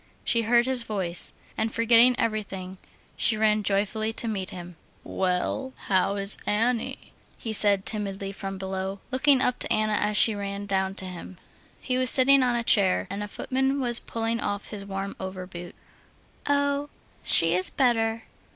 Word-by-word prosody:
She 230 - 0
heard 235 +2 +2
his 260 -1 0
voice. 190 -6 -2 0.2
And 220 - -2
forgetting 230 +2 +4
everything, 195 -4 -4 0.4
she 220 - 0
ran 215 0 +2
joyfully 210 +2 -1
to 230 - -3
meet 195 -4 -3
him. 175 -1 -9 0.3
"Well, 190 +8 -2 0.2
how 195 +1 +1
is 200 0 -1
Annie?" 230 +3 -2 0.2
he 225 -3 -5
said 200 -2 +2
timidly 195 -2 -4
from 195 0 -7
below, 190 +1 -5
looking 270 0 +3
up 250 -1 0
to - - -1
Anna 215 0 +1
as 210 0 0
she 225 - +6
ran 200 0 -5
down 190 -1 -1
to 190 - -4
him. 180 0 -9 0.4
He 255 -1 -2
was 255 -1 +3
sitting 270 +2 +8
on 250 -1 +1
a 235 - -1
chair, 195 -5 +2
and 200 +1 -5
a 210 - -4
footman 265 +5 -2
was 240 -3 +6
pulling 230 0 -3
off 205 -1 -4
his 205 -2 -7
warm 195 0 -6
over 185 -1 -6
boot. 175 -1 -10 0.7
"Oh, 285 0 0 0.3
she 165 0 +5
is 185 +1 +4
better." 225 -4 0
210 Hz, 170 wpm, -25 LUFS, 195-235 Hz, 0.7 s, sitting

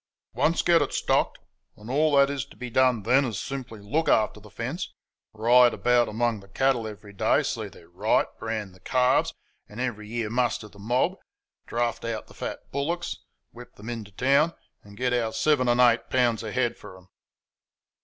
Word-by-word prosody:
"Once 165 +2 +1
get 170 -2 +5
it 145 - -1
STOCKED, - - +1 0.4
and 105 - -13
all 145 +3 +2
that 140 0 +6
is 140 -3 -2
to - - -16
be 125 -1 -6
done 125 -3 +3
then 130 +6 +4
is 115 -7 -3
simply 130 -6 -6
to - - -16
look 155 +10 0
after 105 -1 +2
the 105 0 -15
fence, 125 - -5 0.4
ride 120 +3 +5
about 120 -1 +3
among 115 0 0
the 100 - -16
cattle 125 +2 +1
every 105 -1 -10
day, 100 - +2
see - - -3
they're - - -16
right, - - +1
brand 110 -4 -4
the 90 - -18
calves, 130 +3 +2 0.4
and 105 - -11
every 115 -5 -3
year 115 -2 -3
muster 120 -2 0
the 100 -1 -18
mob, 120 +5 0 0.5
draft 120 0 -1
out 115 -2 -3
the - - -17
fat - - -5
bullocks, 170 +5 -2 0.3
whip 120 0 -13
them 110 +3 -7
into 110 -4 -7
town, 140 - +3 0.3
and 100 0 -15
get 125 +1 0
our 115 -2 0
seven 145 -2 +2
and 120 +1 +3
eight 120 -1 +4
pounds 120 -3 +2
a 110 - -5
head 120 -1 0
for 95 - -11
them." 95 0 -17
120 Hz, 195 wpm, -26 LUFS, 110-130 Hz, 0.5 s, that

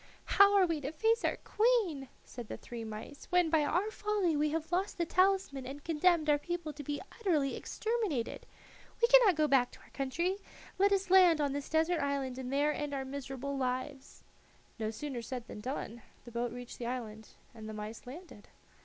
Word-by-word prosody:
"How 400 0 +6
are 380 - +6
we 330 -4 -1
to 275 +1 -3
face 450 +7 +1
our - - +1
queen," 420 - +1 0.2
said 240 -3 -8
the - - -6
three 235 -1 -8
mice 220 +6 -8
"when 360 -3 +3
by 315 -2 +4
our 360 +8 0
folly 415 -6 0
we 300 +1 +2
have 320 +2 -3
lost 375 +3 0
the 340 - 0
talisman 370 -7 +1
and 280 +2 -8
condemned 330 0 +2
our 295 -1 +4
people 345 -1 -4
to 295 - -8
be 290 +1 -3 0.2
utterly 310 -11 +1
exterminated? 435 - -2 0.5
We 470 - +5
cannot - - +7
go 305 0 +2
back 265 -3 +4
to - - -14
our - - -20
country; 335 +8 -1 0.4
let 400 +1 +5
us 390 -2 +1
land 360 -4 +7
on 285 -2 +1
this 285 0 -4
desert 320 +2 +2
island 275 -2 -2
and 255 -1 -5
there 290 +2 +2
end 295 -1 -3
our 270 -1 -3
miserable 275 0 -5
lives." 260 +1 -4 0.6
No 215 -1 -1
sooner 250 +2 -5
said 245 0 -6
than 210 - -9
done. 240 -2 -5 0.2
The 240 - -10
boat 235 0 -2
reached 245 0 -9
the 235 - -3
island, 220 -3 -5 0.3
and 220 -2 -9
the - - -6
mice 215 +3 -7
landed. 290 - -11
290 Hz, 195 wpm, -32 LUFS, 255-360 Hz, 0.6 s, cannot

